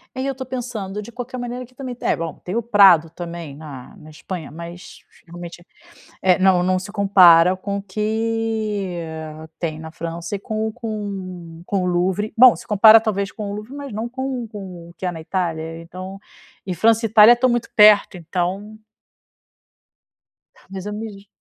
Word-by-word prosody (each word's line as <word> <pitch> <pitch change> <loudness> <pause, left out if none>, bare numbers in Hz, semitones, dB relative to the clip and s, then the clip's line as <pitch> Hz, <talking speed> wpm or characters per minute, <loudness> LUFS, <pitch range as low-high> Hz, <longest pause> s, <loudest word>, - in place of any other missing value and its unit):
E - - -5
aí 260 - -2
eu 275 - 0
estou 260 -1 -7
pensando, 230 -6 -5
de 210 - -11
qualquer 245 +1 -7
maneira 245 0 -5
aqui 255 +1 -17
também 255 -2 -6
é - - +1
bom, 165 -2 -5
tem 180 - -5
o 235 - 0
Prado 195 -7 +6
também 170 -3 -8
na 140 -4 -11
na 155 - -14
Espanha 160 +1 -7
mas 170 +3 -10 0.3
realmente, 175 0 -10 0.8
não 185 -1 +4
não 185 +1 +1
se 190 +2 -8
compara 185 -4 +6
com 200 +2 -4
o - - -6
que 215 -2 -2 0.6
tem 160 -3 -3
na 160 0 -8
França 170 +2 -6
e - - -7
com 220 +2 -3
com 190 -7 -7
com 195 -2 -1
o - - -1
Louvre 185 +4 0
bom, 250 0 +8
se - - -12
compara 215 +2 +7
talvez 200 -3 -2
com 210 -2 -6
o - - -4
Louvre 215 +4 -8
mas 285 -3 -7
não 220 +3 -4
com 260 -1 -4
com 185 -5 -9
o - - -18
que 185 - -5
há 180 - -1
na 165 - -8
Itália 165 -2 -3
então, 185 +3 -9 0.5
e 185 - -2
França 225 +5 +3
Itália 220 +1 +7
estão 240 +2 +2
muito 240 -1 -1
perto 210 -2 +6
então 185 +5 -4 1.9
mas 190 -1 -7
eu 210 - -4
me 220 +1 -5
vejo. 200 0 -15
200 Hz, 180 wpm, -21 LUFS, 175-220 Hz, 1.9 s, bom